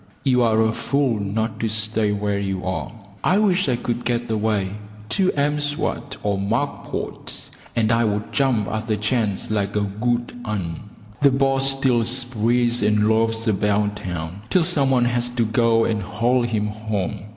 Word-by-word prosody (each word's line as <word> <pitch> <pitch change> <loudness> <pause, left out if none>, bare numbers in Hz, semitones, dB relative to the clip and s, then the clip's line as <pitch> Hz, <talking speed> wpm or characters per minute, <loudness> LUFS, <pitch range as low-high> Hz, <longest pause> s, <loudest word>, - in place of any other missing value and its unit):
You 125 -3 +3
are 110 -2 +3
a 110 0 +1
fool 135 -3 0
not 110 +2 -2
to 115 - 0
stay 110 -1 +1
where 105 -1 -1
you 95 -2 -3
are. 95 0 -3 0.3
I 185 - +3
wish 195 -2 +2
I 125 - +3
could 120 0 -3
get 120 -1 -1
away 105 -3 0 0.4
to 190 - +2
M'Swat 145 -1 -1
or 100 -1 0
Mack 115 +9 -1
Pot, - - -5 0.4
and 115 -1 +2
I 115 0 +3
would 105 0 -2
jump 130 -7 +2
at 110 +2 -3
the 110 -2 0
chance 105 -2 -1
like 100 -1 -1
a 105 - +2
good 120 +4 -1
un. 105 -4 -4 0.3
The 140 - +6
boss 135 0 +2
still 125 -4 +2
sprees 120 0 +1
and 105 0 +3
loafs 115 +1 +1
about 105 0 +1
town 90 0 -5
till 175 +7 +3
some 150 -6 +2
one 125 -2 +3
has 120 0 0
to 120 -1 0
go 115 0 +3
and 110 -2 0
haul 115 +6 +1
him 115 -3 0
home. 105 -3 -3
115 Hz, 175 wpm, -22 LUFS, 105-125 Hz, 0.4 s, The